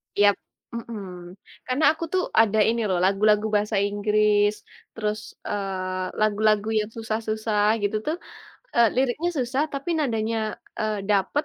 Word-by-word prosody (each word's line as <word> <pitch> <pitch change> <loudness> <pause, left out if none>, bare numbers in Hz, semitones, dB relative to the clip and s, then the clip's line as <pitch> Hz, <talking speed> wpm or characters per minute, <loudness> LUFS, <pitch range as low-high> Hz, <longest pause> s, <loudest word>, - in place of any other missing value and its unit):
Yap! 205 0 +4 0.4
Mhm. 190 -6 -7 0.3
Karena 255 +4 -1
aku 320 +1 -7
tuh 370 -1 +2 0.2
ada 220 -1 +2
ini 230 0 0
loh, 185 - +1
lagu-lagu 210 +2 +3
bahasa 210 0 +1
Inggris, 205 +1 +2 0.4
terus, 215 -1 -2 0.3
eee, 185 -2 -3 0.2
lagu-lagu 215 0 +2
yang 210 0 -2
susah-susah 220 -1 0
gitu 205 +1 +1
tuh, 315 +3 -1 0.6
eee, 235 -1 +6
liriknya 270 +7 +1
susah 260 +3 0
tapi 280 +5 -4
nadanya, 225 -5 0 0.4
eee, 215 -1 -1
dapat, 205 +8 +1
215 Hz, 130 wpm, -24 LUFS, 205-230 Hz, 0.6 s, eee